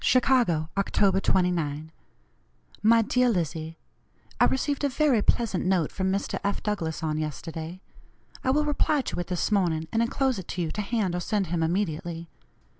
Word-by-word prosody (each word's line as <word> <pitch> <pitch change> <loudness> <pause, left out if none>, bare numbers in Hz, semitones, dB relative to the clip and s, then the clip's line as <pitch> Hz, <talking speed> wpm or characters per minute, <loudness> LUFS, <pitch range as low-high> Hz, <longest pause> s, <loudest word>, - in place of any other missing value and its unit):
"CHICAGO, 240 -12 +3
October 195 -1 +2
29. 160 -5 0 0.9
"MY 230 +2 +5
DEAR 250 +3 +2
LIZZIE: 165 -4 -2 0.6
I - - +6
received 285 +2 0
a 285 - +3
very 275 -4 +2
pleasant 215 -4 +1
note 180 -4 +1
from 190 -1 -1
Mr. 195 +1 -2
F. 200 0 -1
Douglass 165 -7 -2
on 155 -1 -1
yesterday. 160 +3 -5 0.6
I - - 0
will 300 +3 +2
reply 295 0 +1
to 250 - -4
it 175 - -3
this 180 +3 -1
morning, 170 -6 +1
and 225 - +1
enclose 255 0 0
it 185 - -9
to 180 - -3
you 160 - -3
to 210 - -3
hand 210 -3 -1
or 180 - -1
send 200 +1 -1
him 170 - 0
immediately. 165 -1 -2
190 Hz, 170 wpm, -26 LUFS, 165-230 Hz, 0.9 s, I